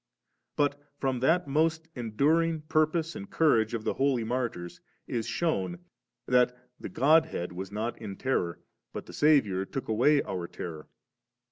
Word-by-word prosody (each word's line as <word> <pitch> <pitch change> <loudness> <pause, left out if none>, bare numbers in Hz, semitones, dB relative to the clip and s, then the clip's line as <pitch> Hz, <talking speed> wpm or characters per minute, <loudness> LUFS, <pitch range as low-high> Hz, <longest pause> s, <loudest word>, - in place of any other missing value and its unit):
But 145 0 +1 0.2
from 135 -3 -1
that 160 +6 +2
most 160 +3 +1
enduring 150 +8 +1
purpose 155 +1 0
and 205 -2 -7
courage 115 -8 +2
of 110 - -4
the - - 0
Holy 135 -3 +1
Martyrs 115 -7 -3 0.2
is 115 -2 -3
shewn, 95 - -1 0.5
that 125 0 +3 0.2
the - - -6
G<^ 155 +4 +4
head 85 - -4
was 95 +2 -6
not 110 +3 -3
in 100 -3 -6
terror, 90 - -1 0.3
but - - -6
the - - -12
Saviour 130 -12 +3
took 130 +7 -5
away 140 +7 +4
our 90 -2 -4
terror. 80 -4 -7
130 Hz, 150 wpm, -29 LUFS, 105-155 Hz, 0.5 s, G<^